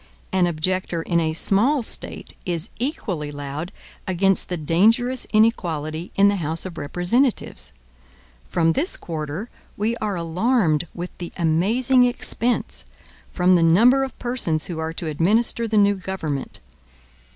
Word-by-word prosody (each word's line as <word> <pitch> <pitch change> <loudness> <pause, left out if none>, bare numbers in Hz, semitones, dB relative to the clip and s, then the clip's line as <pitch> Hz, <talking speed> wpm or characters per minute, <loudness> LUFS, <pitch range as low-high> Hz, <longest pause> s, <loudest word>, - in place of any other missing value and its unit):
An 185 -2 +3
objector 175 +1 -2
in 170 0 +1
a 160 -1 0
small 230 - +3
State - - -4
is 175 +1 -2
equally 195 - -3
loud 145 +4 -6 0.4
against 190 +1 +2
the 180 - -2
dangerous 225 - +2
inequality 170 -7 +1
in 200 +1 +5
the 200 0 +2
House 160 0 -2
of 175 -3 -7
Representatives. 180 - 0 0.8
From 165 -2 +2
this 330 - +1
quarter, 160 +5 -5 0.3
we 220 +3 0
are 210 -3 -2
alarmed 175 - +1
with 175 +1 -6
the 175 - -6
amazing 225 +10 +3
expense, 245 0 -2 0.5
from 180 0 +3
the 175 - +4
number 230 +12 +5
of 265 - -6
persons 240 -11 -1
who 170 -3 -5
are 160 0 -2
to 170 - -5
administer 210 +9 +1
the 220 -1 0
new 205 0 +5
government. 185 -7 -5
180 Hz, 140 wpm, -22 LUFS, 165-225 Hz, 0.8 s, in